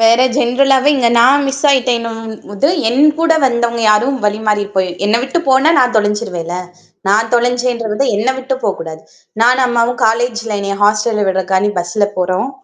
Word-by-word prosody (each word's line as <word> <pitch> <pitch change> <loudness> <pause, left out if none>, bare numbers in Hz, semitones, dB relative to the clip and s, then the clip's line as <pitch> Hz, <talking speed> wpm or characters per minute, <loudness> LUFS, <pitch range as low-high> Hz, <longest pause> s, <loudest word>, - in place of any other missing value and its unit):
வேற 225 +2 +4 0.2
ஜெனரலாவே 270 +2 +2
இங்க 245 -3 +2
நான் 275 +4 +4
மிஸ் 275 +2 -4
ஆயிட்டேன்னோம்ன்னு 230 -4 -1
போது, 205 +7 0 0.2
என் 265 +6 +3
கூட 330 0 +3
வந்தவங்க 235 -1 -1
யாரும் 245 +6 +1
வழிமாறி 210 0 0
போய் 190 -1 0 0.2
என்ன 210 +2 +1
விட்டு 270 +6 -2
போனா 265 +4 +4
நான் 250 -2 +2
தொலஞ்சுருவேன்ல. 205 -5 -2 0.5
நான் 220 +3 +1
தொலைஞ்சென்றது 240 -1 -1
என்ன 220 +5 -1
விட்டு 260 +1 -3
போக்கூடாது. 165 -6 -4 0.4
நானும் 250 +3 +3
அம்மாவும் 240 0 0
காலேஜ்ல 230 -1 -1
என்னைய 200 0 -3
ஹாஸ்டல்ல 210 +1 +1
விட்றதுகாண்டி 190 +1 0
பஸ்ல 175 +4 -1
போறோம். 185 +7 -1
230 Hz, 145 wpm, -14 LUFS, 205-255 Hz, 0.5 s, வேற